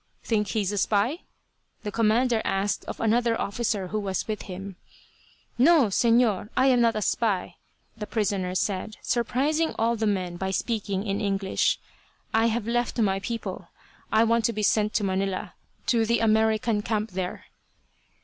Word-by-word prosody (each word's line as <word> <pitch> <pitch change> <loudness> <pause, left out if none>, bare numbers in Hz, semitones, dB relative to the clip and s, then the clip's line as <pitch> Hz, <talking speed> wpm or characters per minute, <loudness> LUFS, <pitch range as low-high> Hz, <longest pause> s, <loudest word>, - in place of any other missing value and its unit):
"Think 210 -3 0
he's 200 -1 -1
a 205 - -1
spy?" 220 - +1 0.6
the 210 - -3
commander 230 +1 +2
asked 195 +1 -1
of - - -6
another 230 +1 +2
officer 200 -3 -2
who 215 - -1
was 195 -3 -3
with 215 -2 -3
him. 190 +1 -7 0.8
"No, 290 -3 +5
Señor, 230 -1 +2
I 260 - +4
am 250 -2 +4
not 230 -1 +3
a 215 - -1
spy," 205 -5 -1 0.4
the 210 -2 -6
prisoner 195 -4 -1
said, 200 +2 -2
surprising 275 +7 0
all 230 +1 +2
the 220 -1 -1
men 185 -4 -1
by 190 +1 -2
speaking 200 -1 -2
in 200 -1 -1
English. 195 -2 +1 0.6
"I 225 +1 +4
have 230 -1 -1
left 240 +1 -1
my 195 -4 +2
people, 230 +4 -5 0.4
I 220 +1 +5
want 230 0 +2
to 235 - +1
be 210 0 -3
sent 210 +1 +2
to 210 - +2
Manila, 190 0 -2 0.3
to 230 -2 +2
the 235 +1 +2
American 220 0 +2
camp 215 0 -2
there." 180 -1 -4
215 Hz, 160 wpm, -26 LUFS, 195-230 Hz, 0.8 s, No